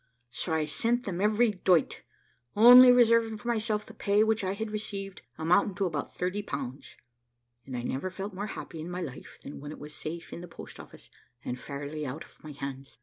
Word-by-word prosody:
So 165 - -4
I 155 -1 +1
sent 235 +10 0
them 185 -4 -4
every 215 +2 +3
doit, 180 -4 +2 0.5
only 245 +4 +10
reserving 230 -2 +4
for 210 - -10
myself 215 -2 -1
the - - -13
pay 205 +1 +2
which 220 -1 +1
I 190 0 -1
had 220 +1 -4
received, 200 -2 -5 0.2
amounting 180 +5 +2
to 195 - 0
about 155 -5 -4
30 185 +3 -2
pounds: 140 -8 -6 0.7
and 130 -2 -5
I 120 - -4
never 135 +9 -2
felt 195 +2 -6
more 200 +3 -4
happy 165 -6 -7
in 165 - -6
my 180 +1 -4
life 135 -5 -9
than 140 - -8
when 145 +1 -8
it - - -8
was 150 +1 -9
safe 165 +3 -7
in - - -7
the 175 - -8
post 165 - -11
office, - - -13 0.3
and 125 - -4
fairly 145 +4 -6
out 145 +3 -5
of - - -21
my 155 - -8
hands. 135 -2 -7
185 Hz, 205 wpm, -29 LUFS, 150-215 Hz, 0.7 s, only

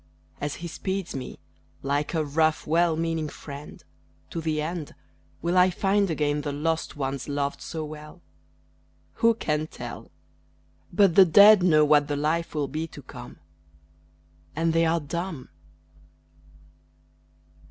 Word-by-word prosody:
As 145 0 -2
he 170 - -6
speeds 190 +2 -4
me, 130 -1 -6 0.5
like 145 +4 -1
a 155 -1 +1
rough, 155 +2 +1
well 165 +1 +2
meaning 165 -2 -1
friend, 145 0 -10 0.5
To 165 - -3
the 155 -1 -1
end, 160 0 -4 0.5
Will 170 +2 0
I 180 0 +6
find 195 +2 +1
again 150 -2 0
the 145 0 -3
lost 160 +3 -2
ones 135 0 -3
loved 140 0 -2
so 160 -1 -5
well? 150 +3 -11 1.0
Who 230 -1 +5
can 155 -7 -1
tell! - - -9 0.8
But 200 -4 +4
the 190 +2 +8
dead 205 +4 +8
know 155 -4 +5
what 145 -1 +4
the 145 - -1
life 160 +3 -1
will 145 -2 0
be 155 +3 -4
to - - -12
come - - -11 1.2
And 165 +1 +1
they 165 0 +3
are 165 +1 +2
dumb! 165 -1 -5
160 Hz, 140 wpm, -26 LUFS, 150-170 Hz, 1.2 s, the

